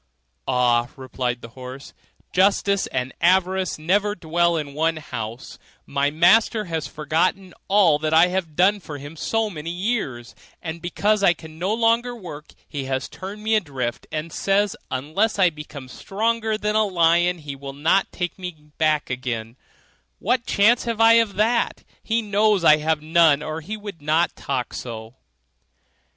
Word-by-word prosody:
'Ah!' 120 -1 +2
replied 125 -2 -3
the 115 - -8
horse, 130 +3 -10 0.4
'justice 200 +1 +2
and 130 0 -3
avarice 185 +1 +2
never 200 +6 +1
dwell 170 -1 +1
in 145 -3 -4
one 160 +2 0
house; 115 -5 -7 0.3
my 140 0 0
master 185 +8 +4
has 160 -4 -3
forgotten 165 +5 -1
all 190 -7 +4
that 155 0 -1
I 165 +3 +6
have 180 -4 -3
done 195 +4 +3
for 155 -5 -8
him 145 +3 -9
so 225 +7 0
many 165 -5 -6
years, 175 - -3 0.3
and 165 0 -6
because 205 +4 +1
I 175 -3 +4
can 160 -1 -13
no 185 +4 -1
longer 230 +2 +1
work 160 -8 -10
he 140 -3 -5
has 130 0 -2
turned 200 +3 -9
me 220 +1 +1
adrift, 135 - -2
and 155 +1 -4
says 200 +1 +1
unless 155 +13 -1
I 185 -3 +4
become 150 -3 -9
stronger 220 - -1
than 210 0 -1
a 215 - +4
lion 175 -2 +3
he 145 -3 -7
will 135 0 -8
not 160 +7 +1
take 180 0 -4
me 180 -2 -6 0.2
back 155 -4 +1
again; 120 -3 -4 0.6
what 240 +3 0
chance 230 +5 +3
can 230 -2 -2
I 225 0 +7
have 230 -1 +4
of 200 - -16
that? 225 +4 +1 0.2
he 230 +1 0
knows 210 -2 +2
I 155 -2 +7
have 155 0 -1
none, 155 -2 +4
or 155 +1 -4
he 210 +7 -6
would 205 -6 -9
not 155 +4 +1
talk 130 -3 -3
so. 115 -1 -7
170 Hz, 165 wpm, -23 LUFS, 145-205 Hz, 0.6 s, I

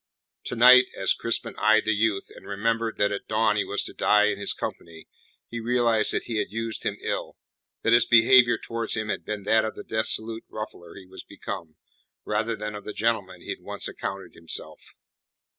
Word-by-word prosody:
To - - -4
night, 125 +2 +8
as 95 - +2
Crispin 115 0 -3
eyed 110 0 +4
the 110 - +2
youth, 105 -1 0
and - - -13
remembered 115 +3 -1
that 100 0 +2
at 100 - -5
dawn 110 -1 +2
he 105 - +1
was 100 - -2
to - - -7
die 105 0 +3
in 100 -1 -3
his 100 - -2
company, 80 -1 -7 0.4
he 120 - -6
realized 115 -2 +2
that - - -1
he 115 - -4
had - - -1
used 115 0 -3
him - - -2
ill, - - -3 0.5
that 115 - +3
his 120 - +5
behaviour 120 0 +6
towards 115 0 -4
him 110 -1 -3
had - - -2
been 105 -2 -5
that 110 +2 +3
of 110 - -4
the - - -8
dissolute 110 +1 -1
ruffler 105 -5 -8
he 95 - -11
was 90 - -10
become, 80 -2 -8 0.5
rather 110 +2 -1
than 105 0 -5
of 105 - -8
the 105 - -6
gentleman 100 -6 -1
he - - -12
had - - -4
once - - -5
accounted 95 0 -6
himself. 85 0 -7
110 Hz, 200 wpm, -25 LUFS, 100-115 Hz, 0.5 s, night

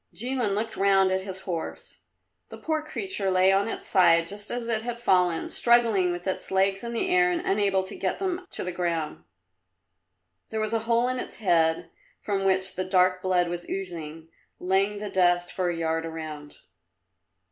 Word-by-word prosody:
Jilin 240 -3 0
looked 220 +1 -2
round 195 -1 +4
at 190 0 0
his 190 -1 -7
horse. 170 -4 -6 0.5
The - - -9
poor 315 -1 -1
creature 310 - -3
lay 185 +1 +4
on 195 +2 +2
its - - -6
side 170 -3 +4
just 205 +2 -7
as 240 -1 -3
it 225 -2 0
had 235 0 -5
fallen, 180 -6 +2
struggling 230 -7 +3
with 175 0 -5
its 190 - -3
legs 195 +1 +1
in 235 0 -5
the 235 +11 -1
air 360 0 +4
and 350 -1 0
unable 195 -1 +1
to 190 - -9
get 190 - -2
them 370 -1 -3
to - - -2
the 180 - -3
ground. 170 -3 -3 1.2
There 220 - -3
was 215 0 -1
a 225 - +2
hole 235 +1 +3
in 255 0 -1
its - - -6
head 165 -4 +1 0.3
from 195 -2 -2
which 190 0 +1
the 185 - -1
dark 185 0 +2
blood 180 -1 +2
was 175 0 -5
oozing, 165 -4 -6 0.3
laying 195 +3 +1
the 205 -1 -5
dust 175 -1 +2
for 180 -2 -1
a 170 - -3
yard 165 0 -1
around. 155 -2 -8
190 Hz, 185 wpm, -26 LUFS, 175-220 Hz, 1.2 s, round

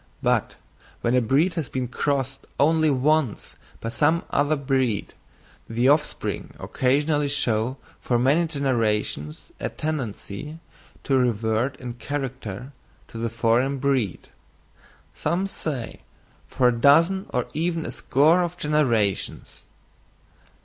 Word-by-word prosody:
But - - +1 0.5
when 120 - +1
a 125 - +4
breed 140 +10 +2
has 165 -5 -3
been 130 -1 -2
crossed 135 +1 -2
only 155 +2 +4
once 145 -2 +1 0.3
by 115 - -3
some 150 +8 +2
other 145 +2 +2
breed, 130 -6 -1 0.6
the 120 +3 +2
offspring 150 +1 0
occasionally 145 +3 +1
show 130 -3 0 0.2
for 120 - 0
many 140 +8 +3
generations 115 - -1
a - - -2
tendency 150 -1 -5 0.5
to 135 - +1
revert 115 +1 0
in 125 -2 -6
character 125 -2 -5 0.4
to 115 - -8
the 115 0 -1
foreign 120 +4 +1
breed—some 140 - -4
say, 155 -10 -4 0.5
for 125 -2 +3
a 120 -1 -2
dozen 165 +9 +4
or 125 -2 -1
even 165 +1 -1
a - - -4
score 155 +7 +3
of 175 0 -3
generations. 120 -10 0
135 Hz, 115 wpm, -24 LUFS, 120-150 Hz, 0.6 s, a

